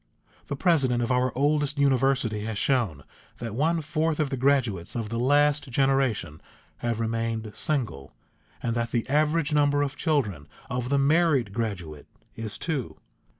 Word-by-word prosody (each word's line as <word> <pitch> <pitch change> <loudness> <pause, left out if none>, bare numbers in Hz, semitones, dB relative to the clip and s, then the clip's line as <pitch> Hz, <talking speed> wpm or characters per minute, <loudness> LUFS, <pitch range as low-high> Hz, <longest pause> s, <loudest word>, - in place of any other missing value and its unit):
The 140 - -3
president 135 -7 +2
of 120 - -1
our 125 0 +2
oldest 145 +1 +1
university 135 -5 +2
has 110 -2 -3
shown 110 - +1 0.3
that 115 -3 -5
one 160 +7 +1
fourth 155 +1 -1
of 150 -2 0
the - - 0
graduates 125 -9 +1
of 115 -3 -3
the 115 +1 -2
last 145 +2 +3
generation 125 - +1 0.4
have 115 -2 -2
remained 115 -1 -2
single, 115 - -2 0.5
and 115 - 0
that 115 0 -1
the 115 -1 -1
average 150 +2 +1
number 145 -1 +3
of 145 0 -3
children 110 - -1 0.2
of 125 0 -2
the 140 - +2
married 140 - +3
graduate 90 -10 -4 0.3
is 110 -2 -6
two. 150 -8 -3
130 Hz, 150 wpm, -26 LUFS, 115-145 Hz, 0.5 s, last